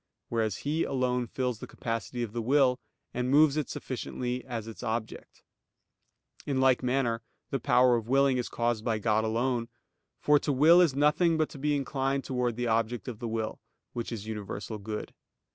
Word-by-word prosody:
Whereas 110 Hz, -4 st, 0 dB
He 155 Hz, +3 st, +1 dB
alone 125 Hz, -2 st, 0 dB
fills 125 Hz, -2 st, -2 dB
the -, -, -8 dB
capacity 115 Hz, +1 st, -4 dB
of 110 Hz, -3 st, -5 dB
the 120 Hz, -, -2 dB
will, 130 Hz, +1 st, +3 dB, 0.3 s
and 125 Hz, +1 st, -1 dB
moves 145 Hz, +1 st, +5 dB
it 155 Hz, -2 st, -1 dB
sufficiently 125 Hz, 0 st, -4 dB
as 115 Hz, -4 st, -4 dB
its 115 Hz, -, -9 dB
object. 115 Hz, -1 st, -5 dB, 1.0 s
In 135 Hz, -2 st, 0 dB
like 130 Hz, -1 st, +4 dB
manner 125 Hz, -3 st, 0 dB, 0.3 s
the 135 Hz, -, 0 dB
power 125 Hz, +1 st, +4 dB
of 115 Hz, -1 st, -3 dB
willing 135 Hz, 0 st, +3 dB
is 120 Hz, -, -3 dB
caused 120 Hz, -2 st, -1 dB
by 115 Hz, -2 st, 0 dB
God 110 Hz, 0 st, +1 dB
alone. 115 Hz, +1 st, 0 dB, 0.5 s
For 150 Hz, 0 st, +4 dB
to 145 Hz, -, -1 dB
will 160 Hz, +6 st, +6 dB
is 160 Hz, -7 st, +3 dB
nothing 150 Hz, +4 st, +3 dB
but 155 Hz, -1 st, +1 dB
to 140 Hz, -, -10 dB
be 150 Hz, +1 st, +1 dB
inclined 135 Hz, -1 st, -1 dB
towards 125 Hz, -3 st, -1 dB
the 120 Hz, -, -1 dB
object 115 Hz, +1 st, 0 dB
of 120 Hz, -4 st, -6 dB
the 120 Hz, -, -4 dB
will, 110 Hz, -1 st, -3 dB, 0.3 s
which 120 Hz, 0 st, -4 dB
is 110 Hz, -3 st, -5 dB
universal 105 Hz, 0 st, -5 dB
good. 105 Hz, +1 st, -6 dB
125 Hz, 180 wpm, -29 LUFS, 115-135 Hz, 1.0 s, will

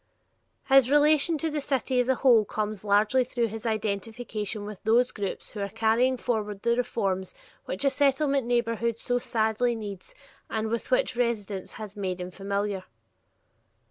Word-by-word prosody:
His 270 Hz, -2 st, +6 dB
relation 300 Hz, +2 st, +4 dB
to 320 Hz, +2 st, -2 dB
the 295 Hz, -1 st, -2 dB
city 265 Hz, -2 st, 0 dB
as 250 Hz, +1 st, +1 dB
a 260 Hz, -, +4 dB
whole 240 Hz, -3 st, +5 dB
comes 210 Hz, -1 st, -3 dB
largely 210 Hz, +5 st, +3 dB
through 240 Hz, -2 st, -1 dB
his 225 Hz, +2 st, -5 dB
identification 215 Hz, 0 st, -3 dB
with 210 Hz, -2 st, -8 dB
those 235 Hz, +3 st, +3 dB
groups 200 Hz, -2 st, -5 dB
who 210 Hz, -, -7 dB
are 200 Hz, 0 st, -2 dB
carrying 225 Hz, +4 st, +2 dB
forward 210 Hz, -5 st, -2 dB
the 235 Hz, 0 st, +3 dB
reforms 195 Hz, -6 st, -2 dB, 0.3 s
which 185 Hz, -, -3 dB
a 275 Hz, -, +4 dB
Settlement 275 Hz, -1 st, +2 dB
neighborhood 235 Hz, -1 st, 0 dB
so 245 Hz, +1 st, 0 dB
sadly 230 Hz, +1 st, 0 dB
needs 210 Hz, -, -8 dB, 0.3 s
and 220 Hz, 0 st, -2 dB
with 230 Hz, +1 st, -3 dB
which -, -, +2 dB
residence 215 Hz, -5 st, -2 dB
has 215 Hz, -2 st, -8 dB
made 190 Hz, -3 st, -3 dB
him 180 Hz, 0 st, -5 dB
familiar. 200 Hz, 0 st, -3 dB
225 Hz, 160 wpm, -27 LUFS, 205-250 Hz, 0.3 s, His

